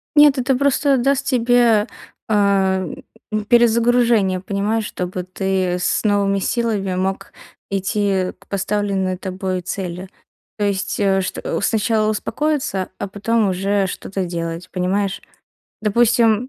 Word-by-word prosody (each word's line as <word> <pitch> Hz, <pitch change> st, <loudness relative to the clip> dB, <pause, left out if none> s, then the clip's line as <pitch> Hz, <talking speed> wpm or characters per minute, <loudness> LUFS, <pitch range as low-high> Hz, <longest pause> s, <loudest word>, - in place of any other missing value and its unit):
Нет, 295 Hz, -2 st, +7 dB
это 255 Hz, +1 st, +1 dB
просто 280 Hz, 0 st, +2 dB
даст 275 Hz, +2 st, +1 dB
тебе, 240 Hz, -4 st, +3 dB, 0.4 s
а, 195 Hz, -2 st, +2 dB, 0.5 s
м, 215 Hz, -1 st, -2 dB
перезагружение, 235 Hz, -4 st, +3 dB
понимаешь, 210 Hz, +3 st, -1 dB
чтобы 180 Hz, -1 st, -4 dB
ты 185 Hz, -1 st, -1 dB
с 180 Hz, -, 0 dB
новыми 200 Hz, -2 st, +2 dB
силами 205 Hz, -4 st, -1 dB
мог 190 Hz, +1 st, -3 dB, 0.4 s
идти 195 Hz, -1 st, 0 dB
к -, -, -22 dB
поставленной 195 Hz, -2 st, -1 dB
тобой 185 Hz, -1 st, -3 dB
цели. 180 Hz, 0 st, -5 dB, 0.5 s
То 205 Hz, -, +1 dB
есть, 200 Hz, +1 st, -2 dB
э, 195 Hz, -1 st, +2 dB
что 185 Hz, -, -3 dB
сначала 215 Hz, +1 st, +1 dB
успокоиться, 260 Hz, -4 st, -1 dB
а 200 Hz, -, -3 dB
потом 210 Hz, +1 st, 0 dB
уже 195 Hz, +1 st, 0 dB
что-то 190 Hz, 0 st, -4 dB
делать, 170 Hz, 0 st, -5 dB
понимаешь? 195 Hz, +2 st, -1 dB, 0.6 s
Допустим, 230 Hz, +2 st, +3 dB
200 Hz, 120 wpm, -20 LUFS, 190-230 Hz, 0.6 s, Нет